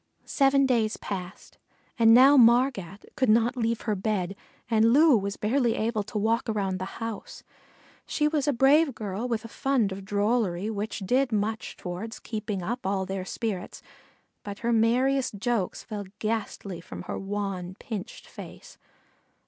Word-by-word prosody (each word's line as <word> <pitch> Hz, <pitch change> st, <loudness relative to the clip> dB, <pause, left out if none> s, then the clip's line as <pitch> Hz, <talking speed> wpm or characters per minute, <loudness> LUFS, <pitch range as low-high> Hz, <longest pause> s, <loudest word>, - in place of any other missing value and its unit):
Seven 275 Hz, 0 st, +3 dB
days 230 Hz, -4 st, +1 dB
passed, 185 Hz, -2 st, -7 dB, 0.4 s
and 225 Hz, -1 st, +6 dB
now 260 Hz, +5 st, +8 dB
Margat 235 Hz, -6 st, +3 dB
could 260 Hz, -4 st, +1 dB
not 230 Hz, +3 st, +3 dB
leave 230 Hz, -1 st, -1 dB
her 215 Hz, -, -1 dB
bed 195 Hz, -2 st, -2 dB, 0.3 s
and 225 Hz, -1 st, +3 dB
Loo 300 Hz, 0 st, +6 dB
was 200 Hz, -1 st, -2 dB
barely 235 Hz, +2 st, +1 dB
able 220 Hz, 0 st, -1 dB
to 210 Hz, +1 st, -6 dB
walk 225 Hz, +3 st, 0 dB
around 195 Hz, -3 st, -1 dB
the 185 Hz, +1 st, -6 dB
house. 225 Hz, -3 st, -6 dB, 0.6 s
She 300 Hz, -, +1 dB
was 300 Hz, -2 st, 0 dB
a -, -, +4 dB
brave 275 Hz, +2 st, +4 dB
girl 210 Hz, +2 st, -4 dB
with 230 Hz, -2 st, -2 dB
a -, -, -5 dB
fund 240 Hz, -3 st, 0 dB
of 190 Hz, +1 st, -6 dB
drollery 205 Hz, -1 st, 0 dB
which 210 Hz, 0 st, -4 dB
did 255 Hz, +4 st, +2 dB
much 220 Hz, +1 st, -2 dB
toward 185 Hz, +5 st, -6 dB
keeping 215 Hz, -4 st, -4 dB
up 240 Hz, +7 st, -3 dB
all 190 Hz, 0 st, -1 dB
their 190 Hz, 0 st, -4 dB
spirits, 200 Hz, -3 st, -4 dB, 0.6 s
but 200 Hz, -1 st, -6 dB
her 235 Hz, -, +2 dB
merriest 250 Hz, +3 st, +2 dB
jokes 225 Hz, -3 st, -1 dB
fell 210 Hz, -3 st, -6 dB
ghastly 210 Hz, -5 st, -3 dB
from 90 Hz, -, -9 dB
her -, -, -5 dB
wan, 195 Hz, -2 st, -4 dB
pinched 220 Hz, 0 st, -7 dB
face. -, -, -12 dB
220 Hz, 155 wpm, -27 LUFS, 200-245 Hz, 0.6 s, now